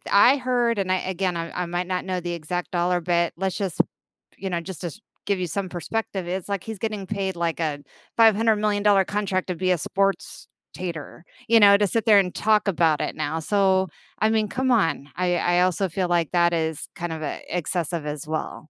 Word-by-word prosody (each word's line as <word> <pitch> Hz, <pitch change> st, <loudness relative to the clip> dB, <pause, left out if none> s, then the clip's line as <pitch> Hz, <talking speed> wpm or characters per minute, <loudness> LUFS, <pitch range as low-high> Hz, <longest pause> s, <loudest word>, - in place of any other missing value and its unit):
I 240 Hz, +7 st, +6 dB
heard, 245 Hz, -3 st, +1 dB
and 190 Hz, -1 st, -1 dB
I 185 Hz, -, +2 dB
again, 185 Hz, -1 st, -2 dB
I 165 Hz, 0 st, -4 dB
I -, -, -3 dB
might 175 Hz, +1 st, -2 dB
not 180 Hz, 0 st, -2 dB
know 185 Hz, -1 st, -1 dB
the 175 Hz, 0 st, -4 dB
exact 170 Hz, +2 st, -4 dB
dollar, 175 Hz, 0 st, +1 dB
but 170 Hz, 0 st, +1 dB
let's 190 Hz, +1 st, -2 dB
just, 190 Hz, -5 st, -3 dB, 0.6 s
you 195 Hz, -, -4 dB
know, 170 Hz, -2 st, -1 dB
just 185 Hz, -1 st, -8 dB
to 175 Hz, -, -3 dB
s 190 Hz, -, -9 dB, 0.3 s
give 200 Hz, -2 st, 0 dB
you 180 Hz, -, -1 dB
some 190 Hz, +4 st, -3 dB
perspective, 190 Hz, +1 st, -4 dB
it's 180 Hz, +1 st, -3 dB
like 200 Hz, -3 st, -2 dB
he's 220 Hz, -3 st, -7 dB
getting 215 Hz, -3 st, -3 dB
paid, 195 Hz, -3 st, -2 dB
like, 170 Hz, -1 st, -2 dB
a 150 Hz, -3 st, -1 dB, 0.4 s
five-hundred-million-dollar 210 Hz, -3 st, +4 dB
contract 200 Hz, -2 st, -1 dB
to 180 Hz, -, -2 dB
be 185 Hz, +2 st, 0 dB
a 180 Hz, -, +3 dB
sports-tator, 180 Hz, -3 st, -4 dB, 0.3 s
you 230 Hz, 0 st, +6 dB
know, 200 Hz, -1 st, +8 dB
to 205 Hz, -, +2 dB
sit 225 Hz, +3 st, -1 dB
there 215 Hz, -3 st, +7 dB
and 180 Hz, -2 st, 0 dB
talk 215 Hz, -1 st, +2 dB
about 165 Hz, -5 st, +2 dB
it -, -, -3 dB
now, 155 Hz, +1 st, -2 dB
so, 190 Hz, +1 st, +2 dB, 0.3 s
I 215 Hz, -, +3 dB
mean, 220 Hz, -1 st, +1 dB
come 260 Hz, +3 st, -1 dB
on, 165 Hz, -, +1 dB
I 180 Hz, -1 st, +1 dB
I 175 Hz, 0 st, +2 dB
also 185 Hz, +1 st, +1 dB
feel 180 Hz, +2 st, -1 dB
like 170 Hz, -3 st, +1 dB
that 175 Hz, -1 st, +3 dB
is 160 Hz, -2 st, -2 dB
kind 175 Hz, -1 st, -4 dB
of 160 Hz, -, -6 dB
a 145 Hz, -, -4 dB
excessive 170 Hz, -2 st, -2 dB
as 150 Hz, 0 st, -5 dB
well. 155 Hz, 0 st, -4 dB
185 Hz, 210 wpm, -24 LUFS, 170-200 Hz, 0.6 s, know